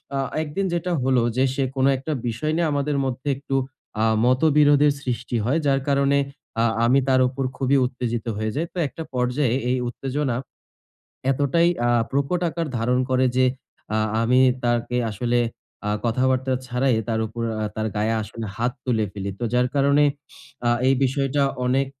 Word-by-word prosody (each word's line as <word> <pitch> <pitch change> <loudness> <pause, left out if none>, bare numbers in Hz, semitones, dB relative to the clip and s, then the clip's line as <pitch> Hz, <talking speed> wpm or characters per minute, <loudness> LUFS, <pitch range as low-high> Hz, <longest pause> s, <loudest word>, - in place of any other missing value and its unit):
আ - - 0 0.2
একদিন 160 +6 -2
যেটা 175 +1 -1
হলো 130 -2 +3 0.2
যে, 130 - +4
সে 140 - +1
কোনো 135 +1 +3
একটা 145 +4 -5 0.2
বিষয় 155 +7 -2
নিয়ে 170 -2 +1
আমাদের 145 0 0
মধ্যে 130 +2 -4
একটু 135 0 -4 0.5
আ - - +3 0.2
মতবিরোধের 145 +2 +4
সৃষ্টি 125 -2 -3
হয়। 145 +7 +2
যার 135 -1 +3
কারণে 140 0 +3 0.4
আ - - +3 0.2
আমি 130 +3 +4
তার 130 0 +4
উপর 135 +1 -3
খুবই 135 +1 +2
উত্তেজিত 120 -2 -3
হয়ে 110 0 -1
যাই। 165 +3 0
তো - - -10
একটা 160 +3 -7
পর্যায়ে 125 0 +1
এই 130 - +2
উত্তেজনা 135 0 -2 1.0
এতটাই 145 +5 +2 0.2
আ - - +3 0.2
প্রকট 140 +6 0
আকার 165 0 -3
ধারণ 125 +3 +1
করে 130 0 +3
যে, 130 - +4 0.5
আ - - +2 0.2
আমি 125 +3 +4 0.2
তাকে 120 +1 0
আসলে 120 +3 0 0.5
আ - - 0 0.2
কথাবার্তা 130 +2 +1
ছাড়াই 125 0 +1
তার 110 -1 0
উপর 115 +2 -6 0.2
আ - - 0
তার 110 0 -2
গায়ে 110 +2 +1
আসলে 110 +1 -7
হাত 120 +2 0
তুলে 115 -4 +1
ফেলি। 100 -1 -4
তো - - -1
যার 125 0 +3
কারণে 140 +1 +4 0.6
আ - - +4 0.2
এই 135 - +5
বিষয়টা 135 +1 +1 0.2
অনেক 135 +2 +2
130 Hz, 170 wpm, -23 LUFS, 120-140 Hz, 1.0 s, এই